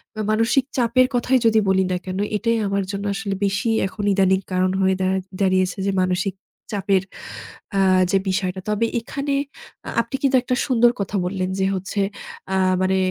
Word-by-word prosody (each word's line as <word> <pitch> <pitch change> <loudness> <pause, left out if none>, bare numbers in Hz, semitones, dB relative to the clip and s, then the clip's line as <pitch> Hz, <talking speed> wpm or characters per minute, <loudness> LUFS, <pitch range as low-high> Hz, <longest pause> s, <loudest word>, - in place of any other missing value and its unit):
বা, 215 - -3
মানসিক 225 +5 +2
চাপের 250 +1 +3
কথাই 255 +2 +2
যদি 220 -1 +5
বলি 190 0 +3
না 180 - +1
কেন, 185 0 -4 0.2
এটাই 230 +1 0
আমার 200 0 0
জন্য 200 0 -4
আসলে 200 -2 -3
বেশি 200 +4 0 0.2
এখন 205 +2 -7
ইদানিং 190 -1 +3
কারণ 185 0 +2
হয়ে 190 0 +3
দাঁড় 190 0 +1 0.2
দাঁড়িয়েছে 185 -1 +2
যে - - +2
মানসিক 185 +1 0 0.4
চাপের 195 -2 +1 0.7
আ - - +3 0.3
যে 195 - +4
বিষয়টা। 185 0 -1
তবে 210 +2 +1 0.2
এখানে 280 +4 -3 0.5
আ - - -4
আপনি 235 +3 -6
কিন্তু 275 -1 +3
একটা 250 - 0
সুন্দর 240 -2 +4
কথা 200 +1 -3
বললেন 185 0 -2
যে, 190 - +2
হচ্ছে 190 +2 -3 0.5
আ - - +2 0.3
মানে 190 0 +2
195 Hz, 175 wpm, -22 LUFS, 190-230 Hz, 0.7 s, যদি